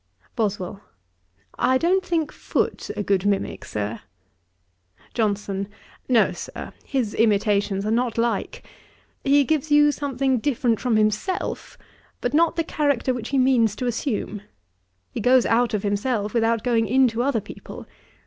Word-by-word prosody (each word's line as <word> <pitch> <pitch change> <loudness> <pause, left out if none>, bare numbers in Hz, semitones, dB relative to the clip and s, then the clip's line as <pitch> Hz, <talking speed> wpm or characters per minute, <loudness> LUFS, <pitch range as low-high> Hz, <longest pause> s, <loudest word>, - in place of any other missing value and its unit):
BOSWELL. 200 -2 -2 0.8
'I 260 +1 +3
don't 365 +6 +2
think 330 -4 -1
Foote - - -2
a 205 - -1
good 195 -2 +1
mimick, 200 -1 -1
Sir.' 105 +1 -4 1.1
JOHNSON. 200 -3 -1 0.4
'No, 225 -7 +4
Sir; 175 - -8
his 250 -7 -2
imitations 205 -2 +1
are 215 - 0
not 235 0 0
like. 235 +1 -1 0.6
He 285 +1 +4
gives 310 +2 0
you 295 0 +6
something 270 -3 0
different 240 -3 0
from 245 -3 +1
himself, 215 - -1 0.4
but - - -2
not 330 +2 +3
the 330 - 0
character 285 -5 0
which 240 -2 -5
he 275 - 0
means 250 -5 +3
to 255 - -4
assume. 230 -4 -2 0.7
He - - -4
goes 250 +3 +4
out 235 +1 +2
of 205 - -2
himself, 205 +1 -1
without 230 -1 +1
going 230 -3 +2
into 245 0 +3
other 255 -2 +1
people. - - -10
235 Hz, 140 wpm, -23 LUFS, 210-265 Hz, 1.1 s, you